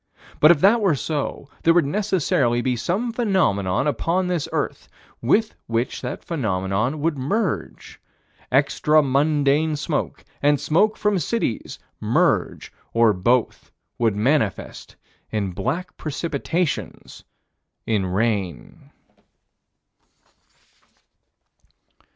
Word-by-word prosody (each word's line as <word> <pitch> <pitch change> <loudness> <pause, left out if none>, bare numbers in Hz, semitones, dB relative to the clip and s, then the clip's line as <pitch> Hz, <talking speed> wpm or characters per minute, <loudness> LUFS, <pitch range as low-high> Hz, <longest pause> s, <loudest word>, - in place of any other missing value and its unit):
But 155 - +7
if 165 -4 +4
it 215 +5 +6
were 190 -7 +3
so, 140 +2 -3
there 165 +1 +4
would 175 -4 +4
necessarily 150 - +1
be 125 0 0
some 190 - -1
phenomenon 160 - +1
upon 165 +6 0
this 180 -4 -2
earth, - - -3 0.3
with 215 - +2
which 115 +2 -2
that 125 - -5
phenomenon 110 - -1
would 155 -3 0
merge. 150 - -3 0.5
Extra 150 +3 +3
mundane 145 +2 +2
smoke 150 +1 -3 0.2
and 145 0 +3
smoke 205 +7 +2
from 210 -2 +1
cities 170 - -2 0.2
merge, - - 0 0.2
or 115 -2 +5
both 120 +6 0 0.3
would 115 -4 +2
manifest 110 0 -1 0.3
in 100 -3 -2
black 165 - -3
precipitations 160 +2 -3 0.6
in 105 -4 0
rain. 100 -3 -2
145 Hz, 100 wpm, -22 LUFS, 115-170 Hz, 0.6 s, But